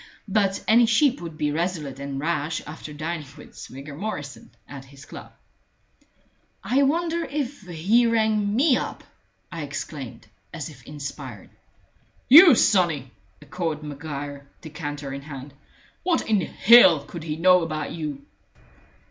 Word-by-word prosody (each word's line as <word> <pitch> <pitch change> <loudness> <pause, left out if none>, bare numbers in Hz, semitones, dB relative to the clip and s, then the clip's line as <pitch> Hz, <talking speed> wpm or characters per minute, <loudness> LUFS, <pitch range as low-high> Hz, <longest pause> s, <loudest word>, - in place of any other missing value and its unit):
But 195 -1 0
any 230 +1 +5
sheep 255 +4 +2
would 165 -2 -8
be 150 -1 0
resolute 155 -4 -3
and 140 -1 -5
rash 155 0 -2
after 150 0 -9
dining 155 0 -5
with - - -14
Swigger 140 +2 -10
Morrison 145 -6 -6 0.2
at 140 -2 -10
his 140 +1 -15
club. - - -11 1.3
"I 265 +3 +2
wonder 335 +4 +1
if 285 -4 -4
he 190 +7 +2
rang 215 -2 +1
me 270 +1 +4
up?" - - -5 0.5
I 165 - -6
exclaimed, 140 -4 -7 0.3
as 160 -2 -6
if 130 -4 -17
inspired. 140 -6 -8 0.8
"You, 320 +1 +10
sonny?" 165 - +2 0.3
echoed 155 0 -4
Maguire, 145 -1 -7
decanter 145 -3 -6
in 140 - -6
hand. 140 -1 -9 0.5
"What 355 -2 0
in 215 -3 +2
hell 185 -4 +6
could 170 - -8
he 155 -1 -4
know 180 +2 +5
about 155 -2 -4
you?" 150 -4 -6
160 Hz, 135 wpm, -24 LUFS, 145-215 Hz, 1.3 s, You